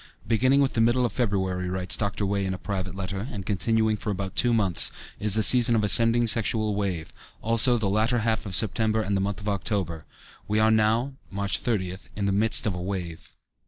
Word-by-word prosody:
"Beginning 130 +5 +2
with 135 - 0
the 115 - 0
middle 120 +2 +2
of 120 - -3
February," 95 -6 -2
writes 90 0 -1
Dr. 100 -1 -2
Wey 100 0 -1
in 95 -1 -3
a - - -7
private 95 -1 -5
letter, 95 +3 -5
"and 100 -4 -7
continuing 110 +2 0
for 105 +1 -6
about 95 -2 -4
two 120 - +2
months, 100 -7 +2 0.3
is 105 0 +3
a 110 - +2
season 120 0 +5
of 110 - +1
ascending 115 +3 +5
sexual 110 -1 +1
wave; 95 -6 -4 0.3
also 115 +2 +3
the 110 -3 -2
latter 110 +5 +1
half 110 -1 -1
of 95 - -2
September 110 0 +2
and 100 0 -2
the 95 - 0
month 100 +1 -3
of 105 - -9
October. 95 -5 -3 0.4
We 105 - -1
are 110 +1 +3
now 110 +5 +1 0.2
(March 100 0 -2
30th) 95 -6 -3
in 100 - -3
the 100 - 0
midst 105 +3 +2
of 105 - -1
a 90 - -6
wave." 90 -3 -6
105 Hz, 210 wpm, -25 LUFS, 95-115 Hz, 0.4 s, season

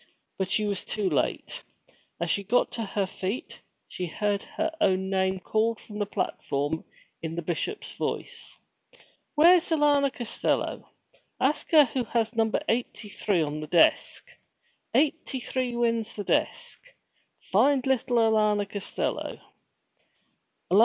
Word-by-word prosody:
But 190 -1 -1
she 215 - +2
was 200 -2 -1
too 210 -3 -1
late. - - -1 0.6
As - - 0
she 200 - +1
got 245 +6 +2
to 230 - -3
her 200 -1 -1
feet, 190 +5 -5 0.3
she 180 - -4
heard 205 +4 -1
her 320 0 -3
own 190 -5 +2
name 190 0 +1
called 220 +4 0
from 210 -1 -9
the 205 - 0
platform, 145 -4 -2 0.4
in 160 0 -4
the 170 - -3
Bishop's 175 - -3
voice. - - -4 0.8
'Where's 340 +3 +6
Alanna 295 -3 +3
Costello? 240 -3 -2 0.5
Ask 280 +3 +1
her 305 -3 +7
who 255 0 -2
has 230 -1 0
number 225 -1 +1
eighty 225 -2 -1
three 195 -4 +1
on 150 0 -3
the 155 - -6
desk. 165 +1 +3 0.7
Eighty 275 -1 +1
three 250 -1 -2
wins 230 -1 0
the 205 - -4
desk! - - -1 0.7
Find 260 +6 +4
little 260 -2 +1
Alanna 215 -2 +3
Costello!' 200 0 -3
220 Hz, 130 wpm, -27 LUFS, 190-255 Hz, 0.8 s, her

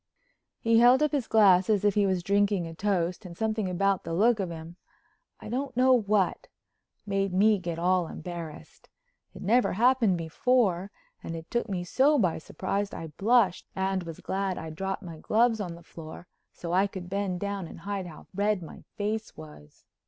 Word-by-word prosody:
He 230 0 +3
held 250 +4 +6
up 300 - +2
his 280 -6 -1
glass 195 -4 +5
as 210 -2 +2
if 205 - +4
he 205 0 +2
was 185 -2 0
drinking 200 -1 +2
a 165 - -7
toast, 185 0 -1
and 175 -3 -10
something 215 -3 -1
about 195 +1 +1
the 165 0 -4
look 220 +4 +3
of 190 -3 -2
him—I 325 - -13
don't 255 +2 -3
know 260 +1 +5
what—made 200 -2 -2
me 210 +1 +4
get 170 -2 -4
all 180 0 +2
embarrassed. 165 -2 -9 0.5
It - - -9
never 235 +6 +3
happened 230 -3 +3
before 190 +2 +1 0.3
and 165 - -6
it 165 0 -9
took 235 -1 -1
me 180 -3 -2
so 270 - +3
by 180 -11 +1
surprise 195 +4 -3
I 160 -2 -7
blushed 215 -3 +3
and 190 0 0
was 165 -2 -8
glad 190 -1 -2
I'd 160 -1 -6
dropped 195 +3 -3
my 165 -3 -9
gloves 225 +4 +2
on 175 -4 -5
the 170 - -14
floor 160 +1 -10 0.3
so 170 0 -6
I 190 +2 +3
could 190 -3 -8
bend 190 -1 -2
down 200 -2 -3
and 165 - -11
hide 195 -1 -4
how 160 - -12
red 200 -1 0
my 160 - -11
face 215 +1 -3
was. 75 -1 -14
195 Hz, 180 wpm, -28 LUFS, 175-220 Hz, 0.5 s, held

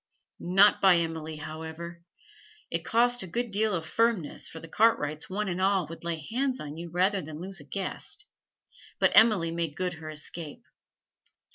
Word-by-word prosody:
Not 195 +4 +5
by 190 -2 +7
Emily, 160 -1 -3
however. 160 +2 -7 0.7
It - - -1
cost 245 +1 +2
a 190 - -5
good 235 +6 -2
deal 210 0 +1
of 165 -2 -3
firmness, 225 -3 +1
for 160 - -9
the 165 - -10
Cartwrights 155 -7 +1
one 205 +2 -2
and 180 0 -2
all 190 -2 +3
would 165 - -9
lay 165 -3 -4
hands 260 +2 0
on 150 0 -7
you 170 +1 -7
rather 185 +3 +1
than 155 -1 -8
lose 190 +1 -6
a - - -11
guest; 195 - -5 0.7
but - - +4
Emily 210 -7 +5
made 165 -3 -3
good 180 -1 -1
her 160 -1 -8
escape. 155 0 -4
175 Hz, 170 wpm, -28 LUFS, 160-205 Hz, 0.7 s, by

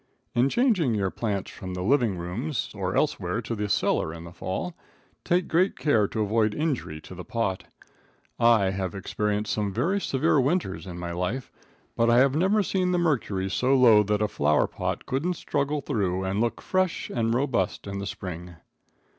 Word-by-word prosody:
In 125 +3 +3
changing 185 - +2
your 95 -2 0
plants 100 -4 -3
from 95 -1 -7
the 90 - -3
living 120 -4 +2
rooms 110 - -3
or 95 -3 -3
elsewhere 110 -10 0
to 115 - -4
the 105 -2 -2
cellar 80 - +1
in 80 0 -8
the 85 0 -10
fall, 95 - -4 0.5
take 175 0 +1
great 180 +4 +2
care 110 -9 +2
to 110 - -3
avoid 110 0 +1
injury 140 - -2
to 90 - -11
the 90 0 -8
pot. 105 -5 -2 0.7
I 115 -5 +4
have 95 -2 -3
experienced 105 +2 -1
some 105 -2 -1
very 170 - 0
severe 145 0 +2
winters 135 - -1
in 90 -1 -7
my 85 0 -4
life, 90 +10 -3 0.4
but 115 0 +3
I 120 - +5
have 135 +1 +5
never 190 +7 +3
seen 185 -1 0
the - - +2
mercury 120 - 0
so 125 +7 +2
low 115 -5 +7
that 105 +1 0
a - - +2
flowerpot 75 -5 0
couldn't 160 +8 -1
struggle 145 -1 -1
through 95 -6 -1
and 95 +3 -1
look 120 0 -1
fresh 185 -2 0
and 115 -2 0
robust 125 -8 0
in 100 -1 -4
the 100 - -4
spring. 90 -2 -7
110 Hz, 180 wpm, -26 LUFS, 95-140 Hz, 0.7 s, low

